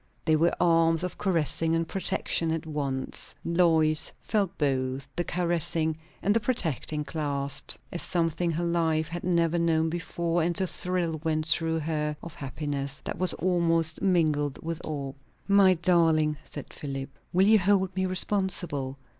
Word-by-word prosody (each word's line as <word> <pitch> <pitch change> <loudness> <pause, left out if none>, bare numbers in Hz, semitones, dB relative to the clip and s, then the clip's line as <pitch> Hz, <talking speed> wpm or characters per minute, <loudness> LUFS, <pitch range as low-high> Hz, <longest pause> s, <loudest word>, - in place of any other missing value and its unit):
They 155 - +4
were 165 +3 +2
arms 165 -1 +3
of 180 - -5
caressing 165 -3 +2
and 165 0 -1
protection 170 -2 0
at 160 0 -2
once; 140 -4 -3
Lois 160 -2 +3
felt 200 -4 -1
both 135 -2 -1
the 175 - 0
caressing 170 -2 +1 0.3
and 205 +2 +2
the - - +4
protecting 160 - -1
clasp, 140 -2 -2 0.2
as 175 - -3
something 170 0 0
her 165 +1 -1
life 165 -2 +1
had 175 +1 -5
never 170 -1 +1
known 160 -1 +1
before; 170 0 -1
and 170 +4 +1
a 190 - +1
thrill 175 -3 -2
went 155 -1 0
through 160 0 +1
her 150 -1 -2
of 170 - -8
happiness 140 0 -4
that - - -5
was 185 0 +1
almost 165 -3 +1
mingled 155 -6 +1
with 165 0 -4
awe. 140 -3 -4 0.3
"My 200 -2 +5
darling!" 165 -3 +3
said 145 - -8
Philip 135 -1 -5 0.2
"will 185 +2 +4
you 215 +1 +6
hold 190 -1 +2
me 185 0 0
responsible? 180 -8 -1
165 Hz, 155 wpm, -27 LUFS, 155-175 Hz, 0.3 s, you